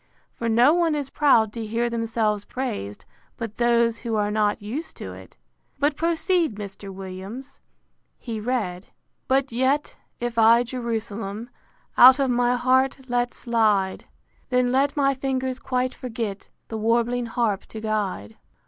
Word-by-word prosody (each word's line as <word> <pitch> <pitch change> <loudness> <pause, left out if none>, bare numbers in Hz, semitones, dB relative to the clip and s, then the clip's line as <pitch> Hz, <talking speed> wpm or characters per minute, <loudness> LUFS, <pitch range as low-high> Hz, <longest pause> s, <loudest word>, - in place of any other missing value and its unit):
For 230 - -3
no 240 +6 +5
one 335 -3 +2
is 285 -2 -4
proud 225 -8 +3
to 230 - -4
hear 230 +2 -1
themselves 225 -3 -1
praised, 105 - -5 0.3
but 225 -2 -6
those 235 -1 +2
who 230 -2 -3
are 210 -1 0
not 210 0 +1
used 235 +10 -6
to - - -7
it.—But 285 +1 -5
proceed, 335 - +1
Mr. 200 -1 -8
Williams. 195 +7 -8 0.6
He 225 -3 -5
read: 210 -6 -2
V. - - -31 0.4
But 265 0 +1
yet, 260 +5 0 0.2
if 240 -1 -2
I 230 +2 +6
Jerusalem 230 -2 -4 0.5
Out 255 +2 +10
of 270 -3 +1
my 245 0 +2
heart 260 +1 +1
let 245 0 0
slide; 215 -5 +1 0.4
Then 250 -1 +2
let 275 +3 +1
my 275 -1 +3
fingers 260 -1 -2
quite 255 0 -1
forget 225 -5 -5 0.2
The 220 - -4
warbling 235 +2 +1
harp 225 -4 -1
to 220 - -8
guide. 205 - -3
235 Hz, 145 wpm, -24 LUFS, 215-260 Hz, 0.6 s, Out